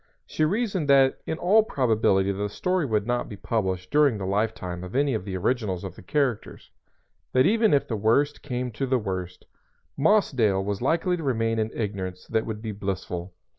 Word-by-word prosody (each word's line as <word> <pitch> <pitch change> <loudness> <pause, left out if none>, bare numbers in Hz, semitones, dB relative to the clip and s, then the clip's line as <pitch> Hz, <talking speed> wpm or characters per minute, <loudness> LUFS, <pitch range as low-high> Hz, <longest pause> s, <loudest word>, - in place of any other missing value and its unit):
She 155 - -2
reasoned 195 -2 0
that 135 -1 +4
in 160 - -2
all 200 +6 +4
probability 110 - +1
the 100 +1 -3
story 180 - -1
would 105 -3 0
not 120 +1 -1
be 105 - -7
published 95 -4 -2
during 145 -6 +4
the 95 - -4
lifetime 100 -3 -2
of 90 +5 -8
any 140 0 +2
of 110 -4 -3
the 95 -2 -3
originals 105 -3 -1
of 95 -2 -7
the - - -12
characters; 125 +4 -2 0.6
that 130 +1 +4
even 220 0 +3
if 140 - +2
the 115 - -2
worst 115 +8 +1
came 125 -3 -3
to 135 +5 -3
the 130 0 +2
worst, 95 -5 -5 0.5
Mossdale 130 - +2
was 100 +1 -3
likely 170 +7 +1
to 165 - -6
remain 115 -4 0
in 110 0 0
ignorance 95 -4 -4
that 110 -1 0
would 110 -1 -5
be 110 - -3
blissful. 95 -3 -5
115 Hz, 190 wpm, -25 LUFS, 100-140 Hz, 0.6 s, that